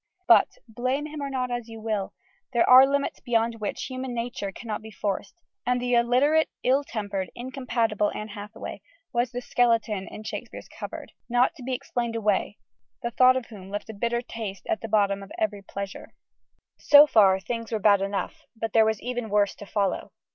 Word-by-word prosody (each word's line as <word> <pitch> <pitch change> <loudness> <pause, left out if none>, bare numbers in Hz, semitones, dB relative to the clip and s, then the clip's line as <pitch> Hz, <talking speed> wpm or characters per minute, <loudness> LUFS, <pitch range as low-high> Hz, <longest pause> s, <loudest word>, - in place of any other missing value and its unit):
But - - +5
blame 255 +6 -2
him 305 -1 -6
or 280 - -3
not, 255 -2 -2
as 240 -1 -4
you 225 0 -9
will 215 -3 -3 0.4
there 235 - +3
are 260 +2 +9
limits 280 0 -1
beyond 230 -1 0
which 205 - -3
human 255 -1 -5
nature 230 -4 -3
cannot 215 +1 -5
be 220 - -10
forced: 205 - -3 0.3
and 250 0 +1
the 245 0 -1
illiterate, 255 +7 +3
ill 270 +3 +3
tempered, 200 -7 -4
incompatible 240 -4 -1
Anne 215 +1 -5
Hathaway 205 +1 -8 0.3
was 240 +1 +1
the 245 - -4
skeleton 225 -6 +1
in 215 - -9
Shakespeare's - - -7
cupboard: - - -8 0.2
not 245 +4 +3
to 320 - -14
be 255 +1 -1
explained 240 -3 -3
away 210 -2 0 0.5
the 235 - -2
thought 255 +2 +5
of 255 - -4
whom 195 -5 -11
left 205 +2 -5
a - - -11
bitter 235 +3 -1
taste 210 -6 -6
at 220 - -1
the 225 - -5
bottom 200 -2 +2
of 195 - -11
every 210 -2 -1
pleasure. 200 0 -7 0.6
So 290 0 +8
far, 200 -9 +5
things 230 +3 -5
were 220 - +1
bad 205 -1 +4
enough; 195 0 -3
but 225 -1 -4
there 225 -1 +6
was 220 -1 0
even 245 -2 -3
worse 205 0 +2
to 205 - -11
follow. 200 -3 -1
230 Hz, 190 wpm, -26 LUFS, 205-250 Hz, 0.6 s, are